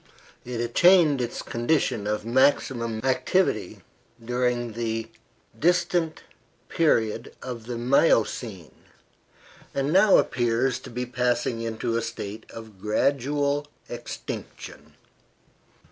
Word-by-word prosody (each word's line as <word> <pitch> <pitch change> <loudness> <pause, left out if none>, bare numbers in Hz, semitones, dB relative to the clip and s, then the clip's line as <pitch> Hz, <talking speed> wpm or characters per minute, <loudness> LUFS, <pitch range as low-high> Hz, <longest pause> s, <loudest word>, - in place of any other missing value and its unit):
It 120 -1 -5
attained 150 +4 +4
its 120 - -4
condition 120 -4 0
of 105 0 -2
maximum 120 -3 +1
activity 130 - 0 0.4
during 125 -1 0
the 115 0 -3 0.5
distant 175 -1 +1 0.5
period 115 -8 +1
of 120 -3 -7
the 120 -1 -4
Miocene, 115 - +1 1.0
and 140 +2 0
now 195 +2 +6
appears 120 +1 +1
to - - -11
be 125 +1 -3
passing 125 -1 -1
into 115 +1 -2
a - - 0
state 110 -2 -6
of 110 -4 -11
gradual 140 +6 0 0.2
extinction. - - -8
120 Hz, 100 wpm, -25 LUFS, 115-140 Hz, 1.0 s, now